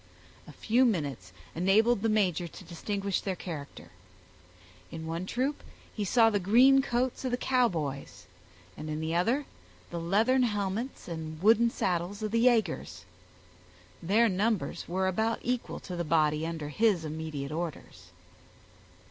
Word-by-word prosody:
A - - -10
few 240 +4 +2
minutes 145 - -1 0.2
enabled 200 +6 +3
the 225 - +1
major 185 -5 +1
to 175 - -12
distinguish 195 +3 -3
their 190 -2 -3
character. 155 -6 -8 1.0
In 160 - -7
one 165 +3 -4
troop 265 +7 -1 0.3
he 210 - -3
saw 225 +2 +4
the 205 - +1
green 250 +8 +5
coats 255 -1 -1
of 260 - -1
the 245 - 0
Cowboys, 175 - -1 0.5
and 155 +1 -7
in 155 0 -3
the 160 +1 -2
other 235 +12 +1 0.5
the 170 - -3
leathern 215 +10 +2
helmets 210 +2 -2
and 160 -2 -6
wooden 230 +2 +5
saddles 185 0 -2
of 215 - -2
the 230 +1 +2
yagers. 90 - 0 1.0
Their 210 +7 +3
numbers 210 +1 -1
were 190 +2 0
about 220 +5 0
equal 245 0 -2
to 180 - -7
the 175 - -2
body 155 -1 +1
under 160 -3 -5
his 195 0 +2
immediate 155 -2 -5
orders. 165 0 -6
190 Hz, 145 wpm, -29 LUFS, 160-230 Hz, 1.0 s, green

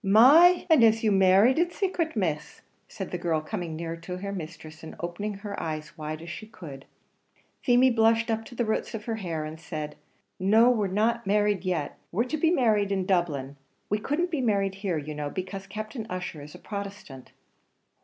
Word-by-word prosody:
"My! 285 - +7
and 315 -8 +6
is 225 0 +4
you 215 - +3
married 195 +8 +5
in 345 0 +2
sacret, 345 -5 -2
Miss?" 160 -7 -2 0.3
said 190 - -7
the 180 - -3
girl, 165 -2 0
coming 170 0 -5
nearer 165 +1 -4
to 180 +2 -6
her 200 +2 -5
mistress, 160 -3 -8
and 160 - -9
opening 200 +5 -4
her 200 +1 -7
eyes 155 -1 -4
as 170 - -25
wide 155 +1 -5
as 170 - -8
she 215 - -8
could. 145 -10 -10 0.8
Feemy 250 +1 +4
blushed 225 0 +3
up 225 0 -1
to 240 - -12
the 240 - 0
roots 220 +1 -2
of 215 0 -7
her 225 -2 -2
hair, 165 -6 -3
and 155 +1 -8
said, 155 -3 -6 0.4
"No, 220 +6 +5
we're 215 -5 +1
not 220 +4 0
married 205 -2 +2
yet; 175 -5 -2
we're 210 +7 +1
to 255 +5 -3
be 320 +2 +3
married 215 - +2
in 190 -2 0
Dublin; 150 -7 -1 0.3
we 210 - +2
couldn't 325 +10 -1
be 305 -5 0
married 200 -5 +1
here 185 -5 -1
you 150 0 -5
know, 150 -1 -4
because 190 +3 -6
Captain 215 +3 -6
Ussher 180 -4 -5
is 150 +1 -11
a - - -8
Protestant." 200 -10 -8
195 Hz, 200 wpm, -27 LUFS, 165-225 Hz, 0.8 s, My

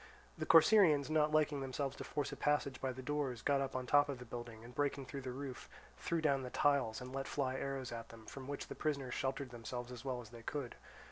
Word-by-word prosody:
The - - -4
Corcyraeans, 160 -5 +7
not 155 -1 +3
liking 150 -2 +2
themselves 135 +1 -2
to - - -5
force 145 - -2
a - - -4
passage 145 -2 +1
by 130 - 0
the 130 +1 -7
doors, 135 -5 -1
got 140 -1 +3
up 135 -1 -3
on 130 0 -1
the - - -10
top 145 0 +6
of 140 - -2
the 125 - -9
building, 120 -1 -7
and 120 +1 -11
breaking 140 0 0
through 140 +1 -6
the 130 - -5
roof, 135 0 -6 0.3
threw 170 -1 0
down 140 -3 +3
the 125 - -5
tiles 130 -6 +2
and 125 +1 -7
let 135 0 -2
fly 130 -3 0
arrows 135 -1 -3
at 115 -1 -6
them, 115 -1 -12
from 130 +2 -8
which 145 0 -4
the - - -5
prisoners 140 -5 -1
sheltered 135 -1 -2
themselves 120 +1 -5
as 125 -1 -8
well 130 -2 -2
as 115 -3 -9
they 120 -1 -10
could. 135 +1 -4
135 Hz, 250 wpm, -37 LUFS, 125-145 Hz, 0.3 s, Corcyraeans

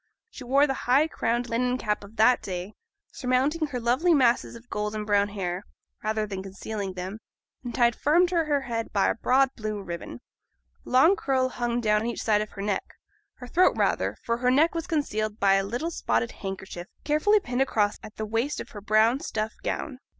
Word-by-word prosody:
She 270 - -9
wore 275 +4 +4
the 270 -3 -4
high 280 +5 +5
crowned 240 -5 -1
linen 250 +2 0
cap 210 -4 -2
of 200 +2 -13
that 230 +3 +4
day, 185 +2 -5 0.4
surmounting 275 +5 0
her 260 -4 -4
lovely 260 +9 +3
masses 250 -4 +2
of 235 +1 -13
golden 210 -1 -3
brown 205 -1 +3
hair, 185 -2 -3 0.4
rather 215 0 0
than 195 -2 -5
concealing 195 +1 -5
them, 185 +4 -6 0.4
and 240 -2 -5
tied 240 -1 +3
firm 335 +5 +4
to 345 -2 0
her 290 -2 +1
head 230 -3 -4
by 200 - +2
a - - +2
broad 260 +3 +3
blue 215 -2 -4
ribbon. 170 -10 -7 0.7
A - - -8
long 295 +10 +6
curl 260 -6 0
hung 240 -1 -2
down 210 -2 +2
on 225 - -2
each 235 - -3
side 210 -2 +3
of 215 - -4
her 200 - -6
neck 205 -2 -2 0.4
her 250 - -10
throat 360 +8 +3
rather, - - 0
for 230 0 0
her 250 +1 +1
neck 295 +6 +4
was 335 0 -3
concealed 215 -9 -1
by 195 -1 +4
a 195 0 +3
little 245 +12 -3
spotted 115 - 0
handkerchief 190 -2 -7 0.2
carefully 310 +9 +3
pinned 250 -7 -2
across 210 -6 +1
at 215 - -11
the 215 - -4
waist 230 +7 -1
of - - -7
her 205 - -9
brown 215 +5 +3
stuff 220 -5 -3
gown. 265 -4 -4
230 Hz, 200 wpm, -26 LUFS, 210-265 Hz, 0.7 s, long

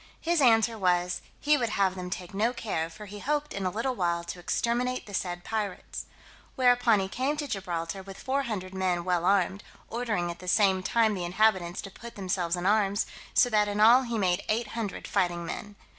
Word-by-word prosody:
His 340 -1 +1
answer 225 -2 +4
was, 180 -1 +1 0.2
"he 295 0 +3
would 235 -2 0
have 195 -3 +2
them 180 -1 -6
take 180 0 -6
no 220 +5 +1
care, 185 -9 -2
for 210 +6 -10
he 205 +1 -9
hoped 295 +4 -1
in 195 -1 -2
a - - +1
little 230 +7 -1
while 170 -5 0
to 170 +1 -7
exterminate 240 +7 -1
the 205 - -11
said 175 -2 -3
pirates." 210 -3 -4 0.5
Whereupon 245 -4 +4
he 190 - -1
came 265 +9 -1
to 295 -1 -3
Gibraltar 185 -3 -3
with 195 0 -10
four 275 +1 -1
hundred 200 -7 -4
men 185 -2 0
well 180 -2 +1
armed, 195 0 +2 0.3
ordering 220 -7 -1
at 170 - -10
the 180 - -10
same 190 -1 +3
time 220 +3 +2
the 185 -3 -3
inhabitants 180 -1 +1
to 195 - -8
put 235 +4 -11
themselves 180 -3 -1
in 175 0 -4
arms, 205 0 +2 0.3
so 250 - +6
that 210 -1 +3
in 205 0 -2
all 235 +4 +7
he 235 -3 -3
made 185 -2 +1
eight 220 0 0
hundred 220 -3 -4
fighting 175 -3 0
men. 205 +4 -6
200 Hz, 205 wpm, -28 LUFS, 180-230 Hz, 0.5 s, all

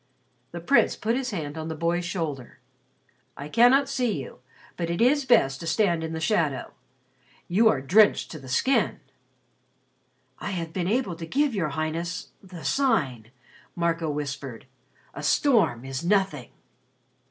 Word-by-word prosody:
The 170 - -7
Prince 275 +12 +3
put 225 +2 -1
his 260 0 -2
hand 160 -6 -5
on 160 - -5
the 160 - -4
boy's 170 +2 -1
shoulder. 155 - -4 0.8
"I 140 - -6
cannot 245 - +5
see 250 - -1
you 130 -2 -9 0.4
but 170 -1 -3
it 170 - -2
is 270 +4 +3
best 140 - +3
to 165 - -7
stand 170 -3 +1
in 160 - -4
the 160 - -4
shadow. 160 -5 0 0.7
You 220 +6 +4
are 135 - +1
drenched 205 +10 +4
to 155 - -7
the 130 -2 -12
skin." 260 - +1 1.4
"I - - -4
have 170 -4 -4
been 180 -2 -2
able 210 -4 0
to 165 -1 -7
give 285 - +1
your 175 -7 -1
Highness 160 +4 -3
the 180 -4 -11
Sign," 150 - 0 0.5
Marco 170 -2 0
whispered. 140 -4 -5 0.5
"A - - -7
storm 215 - +2
is 135 +3 -5
nothing." 180 - 0
170 Hz, 155 wpm, -25 LUFS, 150-220 Hz, 1.4 s, cannot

